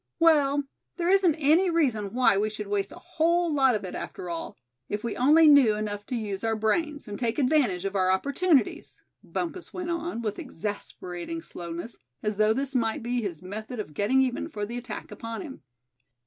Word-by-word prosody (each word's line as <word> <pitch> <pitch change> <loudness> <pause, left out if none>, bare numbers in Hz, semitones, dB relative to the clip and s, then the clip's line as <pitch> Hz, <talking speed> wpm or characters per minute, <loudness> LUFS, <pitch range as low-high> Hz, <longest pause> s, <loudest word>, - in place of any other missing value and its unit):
"Well, 290 -4 +4 0.3
there 345 0 0
isn't 380 -5 +4
any 320 +5 +4
reason 250 - +1
why 250 -5 +5
we 210 +2 +1
should 215 0 -6
waste 200 0 -1
a - - -9
whole 340 -1 +1
lot 265 -4 +4
of 210 - -3
it 180 - -6
after 180 - -6
all, 165 - -5 0.3
if 210 0 -3
we 235 - -2
only 300 +6 +6
know 275 -8 +7
enough 205 -1 -4
to 255 - -3
use 205 -4 -3
our 225 0 +1
brains, 285 +6 -1
and 205 -1 -6
take 230 -2 -1
advantage 255 - +2
of 195 0 -2
our 185 -1 +3
opportunities," 280 - +1 0.2
Bumpus 350 +1 -4
went 355 -1 -3
on, 335 -8 -3
with 210 -2 -3
exasperating 205 - -5
slowness, 175 - -7 0.2
as 210 -1 -1
though 215 0 +4
this 275 +2 -2
might 225 -3 0
be 245 +1 -1
his 185 -6 -5
method 215 +5 -6
of 195 -8 -5
getting 245 - +3
even 255 +4 -2
for 210 -8 -4
the 235 +3 -5
attack 245 - -7
upon 230 +3 -6
him. 280 -6 -9
235 Hz, 190 wpm, -27 LUFS, 205-300 Hz, 0.3 s, know